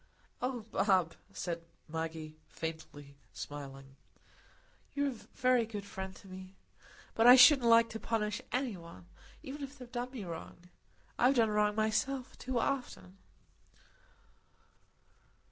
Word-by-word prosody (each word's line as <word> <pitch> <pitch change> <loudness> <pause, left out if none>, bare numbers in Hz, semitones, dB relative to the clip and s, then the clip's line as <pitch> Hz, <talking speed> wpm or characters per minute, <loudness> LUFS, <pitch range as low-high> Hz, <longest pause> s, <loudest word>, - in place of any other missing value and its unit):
"Oh, 250 -1 -2
Bob," 185 -5 +2 0.2
said 170 -2 -4 0.3
Maggie, 160 -1 -5 0.2
smiling 150 -3 -7 0.4
faintly, 135 -2 -9 1.0
"you're 285 0 +1
a 235 - -12
very 250 -3 +3
good 205 -3 -6
friend 190 -2 -6
to 195 - -15
me. 185 0 -10 0.6
But 225 +1 +4
I 250 - +12
shouldn't 255 -1 +8
like 230 0 +7
to 225 - -5
punish 210 -2 -1
any 250 -5 -1
one, 165 - -12 0.4
even 280 +2 -7
if 275 +1 -7
they'd 250 -2 -11
done 245 0 -3
me 250 -5 -7
wrong; 175 0 -8 0.5
I've 255 +3 +5
done 225 -3 +3
wrong 210 0 +2
myself 245 +5 0
too 255 -1 -2
often." 235 -7 -3
215 Hz, 130 wpm, -33 LUFS, 170-250 Hz, 1.0 s, I